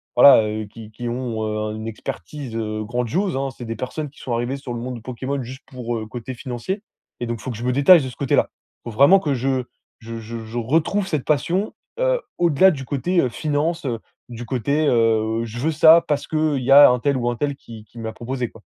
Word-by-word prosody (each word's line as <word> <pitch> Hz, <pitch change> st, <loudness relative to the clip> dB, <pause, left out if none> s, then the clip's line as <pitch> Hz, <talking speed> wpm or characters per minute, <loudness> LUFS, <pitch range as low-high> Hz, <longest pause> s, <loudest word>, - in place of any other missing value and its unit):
voilà, 125 Hz, -2 st, +8 dB
heu, 110 Hz, 0 st, -3 dB
qui 110 Hz, +1 st, -12 dB
qui 120 Hz, +2 st, -6 dB
ont, 120 Hz, -2 st, -3 dB
heu, 105 Hz, 0 st, -2 dB
un 105 Hz, 0 st, -3 dB
une 110 Hz, +1 st, -6 dB
expertise, 120 Hz, +3 st, -7 dB
heu, 110 Hz, -1 st, -3 dB
grandiose 125 Hz, -, -1 dB
hein. 135 Hz, 0 st, -1 dB
C'est 120 Hz, -, -7 dB
des 115 Hz, 0 st, -4 dB
personnes 150 Hz, +4 st, -4 dB
qui 140 Hz, -, -20 dB
sont 125 Hz, -, -3 dB
arrivées 120 Hz, +3 st, -1 dB
sur 135 Hz, -3 st, -7 dB
le 120 Hz, -, -4 dB
monde 125 Hz, +1 st, -5 dB
de -, -, -11 dB
Pokémon, 130 Hz, +3 st, -4 dB
juste 130 Hz, +3 st, -9 dB
pour, 120 Hz, -2 st, -4 dB
heu, 110 Hz, -, -5 dB
côté 120 Hz, +2 st, -7 dB
financier 130 Hz, -, -5 dB, 0.4 s
et 120 Hz, -, -3 dB
donc, 115 Hz, -1 st, -3 dB
faut 130 Hz, -, -4 dB
que 115 Hz, -, -6 dB
je 115 Hz, -, -7 dB
me 125 Hz, -, +2 dB
détache 145 Hz, +4 st, +7 dB
de 130 Hz, -, -4 dB
ce 125 Hz, -, -12 dB
côté-là. 140 Hz, -, +1 dB, 0.3 s
Faut -, -, -6 dB
vraiment 140 Hz, -, +6 dB
que 150 Hz, -6 st, -1 dB
je 130 Hz, +1 st, 0 dB, 0.4 s
je 115 Hz, 0 st, -7 dB
je 115 Hz, 0 st, -7 dB
je 110 Hz, +2 st, -7 dB
retrouve 165 Hz, -, +1 dB
cette 155 Hz, -7 st, -1 dB
passion, 175 Hz, +7 st, 0 dB, 0.3 s
heu, -, -, +2 dB, 0.2 s
au-delà 175 Hz, +2 st, +5 dB
du 135 Hz, -5 st, -6 dB
côté, 170 Hz, +7 st, +1 dB
heu, 130 Hz, -, 0 dB
finances, 155 Hz, +5 st, -1 dB
heu, 120 Hz, -4 st, -2 dB, 0.3 s
du 120 Hz, 0 st, -7 dB
côté, 140 Hz, +6 st, 0 dB
heu,: 115 Hz, -2 st, +2 dB
«Je 115 Hz, +1 st, -7 dB
veux 155 Hz, +6 st, +1 dB
ça, 160 Hz, +2 st, +7 dB
parce 145 Hz, -1 st, -1 dB
qu'il 155 Hz, -4 st, 0 dB
y 130 Hz, -, 0 dB
a 145 Hz, +1 st, +10 dB
un 125 Hz, 0 st, +2 dB
tel 140 Hz, +2 st, +1 dB
ou 120 Hz, -1 st, 0 dB
un 120 Hz, -, -2 dB
tel 140 Hz, +1 st, -1 dB
qui 115 Hz, -5 st, -12 dB
qui 115 Hz, -, -14 dB
m'a 110 Hz, -1 st, -5 dB
proposé 125 Hz, +1 st, -4 dB
quoi». -, -, -17 dB
125 Hz, 240 wpm, -22 LUFS, 115-145 Hz, 0.4 s, a